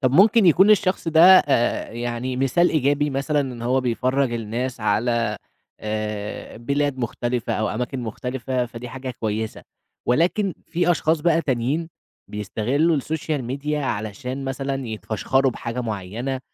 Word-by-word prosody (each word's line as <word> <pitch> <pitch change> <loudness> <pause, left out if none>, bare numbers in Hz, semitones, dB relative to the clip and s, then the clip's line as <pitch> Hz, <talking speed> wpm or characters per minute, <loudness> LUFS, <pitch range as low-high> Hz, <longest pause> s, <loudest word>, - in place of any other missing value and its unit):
طَب 130 -2 +2
ممكن 205 +5 +6
يكون 190 +5 +6
الشخص 190 -4 +2
ده 160 0 +4 0.2
آآ 120 -5 +1
يعني 120 +2 -3
مثال 135 +7 +3
إيجابي 145 0 +1
مثلًا، 140 +2 0
إن 125 -4 -5
هو 130 +2 +2
بيفرّج 130 +2 0
الناس 120 +2 -3
على 115 0 +1 0.4
آآ 105 -1 -4
بلاد 140 +3 -1
مختلِفة 120 0 -2
أو 110 -1 0
أماكن 125 +3 -3
مختلِفة، 125 +2 -3
فدي 120 +1 -8
حاجة 130 +1 -6
كويّسة. 110 0 -3 0.4
ولكن 175 - +2
في 175 +1 +1
أشخاص 160 -2 +2
بقى 165 +1 +3
تانيين، 135 +6 -1 0.4
بيستغلوا 130 - 0
الsocial 155 +1 -2 0.2
media 150 +2 -2
علشان 130 0 -3
مثلًا 135 0 -3
يتفشخروا 115 +5 0
بحاجة 115 0 -5
معيّنة، 115 +4 -4
130 Hz, 135 wpm, -23 LUFS, 115-145 Hz, 0.4 s, ممكن